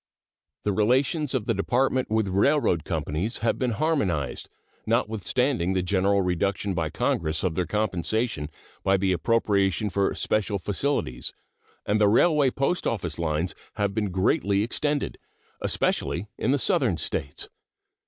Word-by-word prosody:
The 105 - +1
relations 130 - +1
of 120 -5 -1
the 115 - +1
Department 130 +5 +1
with 110 -1 +1
railroad 100 - +2
companies 90 +11 -2
have - - +1
been 130 - +1
harmonized, 100 - -1 0.4
notwithstanding 110 - +1
the 95 -1 0
general 100 +1 +2
reduction 95 +2 0
by 80 -3 -1
Congress 80 0 -1
of 90 -3 +1
their 90 +1 -1
compensation 105 - -1 0.3
by 95 0 +3
the 95 0 +1
appropriation 100 0 +1
for 100 +2 +1
special 105 -1 0
facilities, 100 - -2 0.5
and 105 +1 +1
the 105 - +6
railway 145 +6 +4
post 140 +7 0
office 85 -8 -2
lines 80 +2 -1 0.2
have 100 -2 0
been 105 -1 -1
greatly 100 +2 +1
extended, 145 +5 -1 0.4
especially 85 +4 0
in 120 - -2
the 140 - +4
Southern - - +2
States. 70 +1 -3
100 Hz, 135 wpm, -26 LUFS, 90-120 Hz, 0.5 s, the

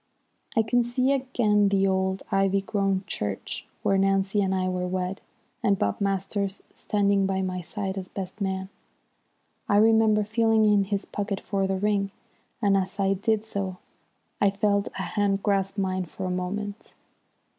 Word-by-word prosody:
I 225 - +4
can 245 +3 +2
see 250 +3 +1
again 235 -7 +2
the 195 -1 +2
old, 190 0 0
ivy 195 0 +2
grown 195 -1 0
church 105 - -4 0.2
where 195 -1 +3
Nancy 195 +1 +2
and 190 -1 +1
I 185 0 0
were 180 0 -1
wed, 185 +1 -3 0.4
and 200 -1 +2
Bob 100 - -1
Masters 195 0 -1
standing 200 -1 +1
by 190 0 0
my 185 -1 -2
side 195 +2 -3
as 185 - -7
best 190 +2 -7
man. 190 -1 -2 1.0
I 205 - +4
remember 220 0 +5
feeling 220 +1 +3
in 205 -2 +4
his 200 0 -2
pocket 200 -1 -3
for 195 -2 -1
the 190 0 0
ring, 200 0 +1 0.5
and 200 -1 +4
as 195 +1 -1
I 195 0 +3
did 215 +2 0
so, 195 -4 -3 0.6
I 200 - +5
felt 200 0 +1
a - - -2
hand 200 -1 0
grasp 195 -1 0
mine 185 -1 -1
for 185 +3 -6
a 185 - -1
moment. 200 +3 -4
195 Hz, 165 wpm, -26 LUFS, 190-210 Hz, 1.0 s, remember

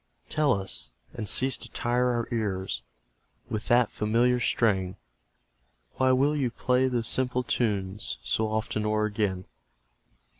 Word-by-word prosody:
Tell 150 -2 +2
us, 95 - -3 0.2
and 110 -3 -4
cease 130 0 +2
to - - -11
tire 125 +1 +1
our 120 -1 -1
ears 95 - -2 0.7
With 110 -1 -3
that 120 -1 +4
familiar 120 +4 +2
strain; 95 -6 +1 1.0
Why 130 0 +4
will 140 +4 +3
you 135 -4 +1
play 125 +2 +1
those 120 -3 -1
simple 125 -1 0
tunes 105 - 0
So 110 - +1
often 110 -1 -1
o'er 105 0 +1
again? 100 -3 -1
115 Hz, 135 wpm, -27 LUFS, 105-125 Hz, 1.0 s, that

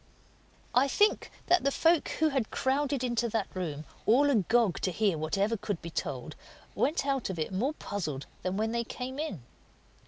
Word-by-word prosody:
I 260 +3 +5
think 415 +9 +2 0.2
that 355 +1 +4
the 275 - +3
folk 325 +3 +3
who 315 -1 +1
had 265 -6 -1
crowded 275 0 0
into 240 -1 0
that 220 -2 -1
room, 155 -5 -4 0.2
all 280 +6 +5
agog 220 - +3
to 185 - 0
hear 200 0 +1
whatever 195 +8 0
could 205 -4 -3
be 170 - -8
told, - - -4 0.4
went 300 0 +1
out 275 -5 0
of 190 - -4
it 160 +4 -3
more 250 +11 0
puzzled 155 - -4 0.2
than 185 +1 -2
when 220 +1 0
they 235 0 0
came 255 +3 -6
in. 250 - -4
230 Hz, 180 wpm, -30 LUFS, 190-275 Hz, 0.4 s, I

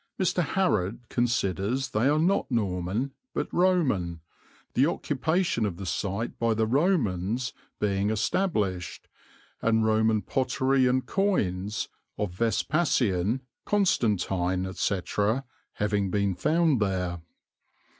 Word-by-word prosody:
Mr. 185 -1 +2
Harrod 135 - 0
considers 120 +1 0
they 120 +3 +2
are 150 - +3
not 170 0 +2
Norman, 105 +2 -1 0.2
but - - -1
Roman, 135 - +2 0.5
the 135 +3 +4
occupation 160 -2 0
of 100 -5 -2
the 95 - -6
site 100 +5 -3
by 115 -1 +2
the 110 0 +2
Romans 120 - +1 0.3
being 100 -1 +1
established, 105 - -1 0.5
and 110 -1 +2
Roman 110 -1 +2
pottery 130 0 +1
and 130 +1 +1
coins 105 - 0 0.3
of 105 -3 -2
Vespasian, 115 - +1 0.2
Constantine, 95 - +1
etc., 100 +6 -1 0.3
having 105 -1 0
been 100 0 +1
found 155 - +2
there. 90 -4 -1
110 Hz, 105 wpm, -27 LUFS, 95-135 Hz, 0.5 s, the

